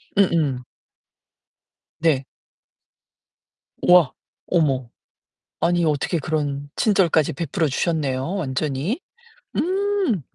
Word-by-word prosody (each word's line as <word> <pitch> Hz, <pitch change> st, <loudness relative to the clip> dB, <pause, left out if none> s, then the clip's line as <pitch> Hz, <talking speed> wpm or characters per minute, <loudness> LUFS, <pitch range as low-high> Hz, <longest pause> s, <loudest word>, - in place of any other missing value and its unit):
음음. 160 Hz, -10 st, +2 dB, 1.4 s
네. 150 Hz, -5 st, +2 dB, 1.6 s
와. 180 Hz, -6 st, +6 dB, 0.4 s
어머. 135 Hz, -8 st, +1 dB, 0.7 s
아니 175 Hz, 0 st, +2 dB
어떻게 155 Hz, +2 st, 0 dB
그런 145 Hz, -1 st, -2 dB
친절까지 180 Hz, -8 st, +3 dB
베풀어 165 Hz, +3 st, -1 dB
주셨네요 145 Hz, +1 st, -1 dB
완전히. 150 Hz, -, -2 dB, 0.6 s
음. 380 Hz, -, 0 dB
160 Hz, 160 characters per minute, -22 LUFS, 140-180 Hz, 1.6 s, 와